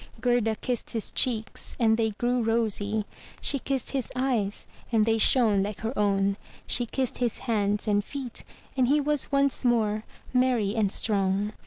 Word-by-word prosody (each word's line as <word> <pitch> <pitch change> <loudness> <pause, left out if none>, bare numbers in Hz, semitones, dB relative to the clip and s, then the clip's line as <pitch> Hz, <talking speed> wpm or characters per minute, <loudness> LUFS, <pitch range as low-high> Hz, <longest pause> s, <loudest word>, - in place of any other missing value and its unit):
Gerda 230 -2 +2
kissed 245 +1 -3
his 225 -2 -1
cheeks, 225 -4 -1
and 220 -2 +4
they 225 -1 +1
grew 240 +4 0
rosy; 220 -2 0 0.3
she 280 - +1
kissed 265 -1 -2
his 270 -3 -3
eyes, 245 -6 -1 0.3
and 220 -2 +3
they 225 0 +2
shone 220 -4 +4
like 200 0 -4
her 225 +3 -2
own; 200 -1 +1 0.3
she 240 - +1
kissed 260 +1 -2
his 240 -3 0
hands 210 -3 0
and 205 -1 +2
feet, 260 -1 -6 0.3
and 255 -2 +3
he 290 +3 +4
was 295 -1 0
once 275 -1 +1
more 220 -3 +2 0.3
merry 250 -5 +2
and 210 -4 +1
strong. 200 0 0
225 Hz, 165 wpm, -27 LUFS, 210-250 Hz, 0.3 s, and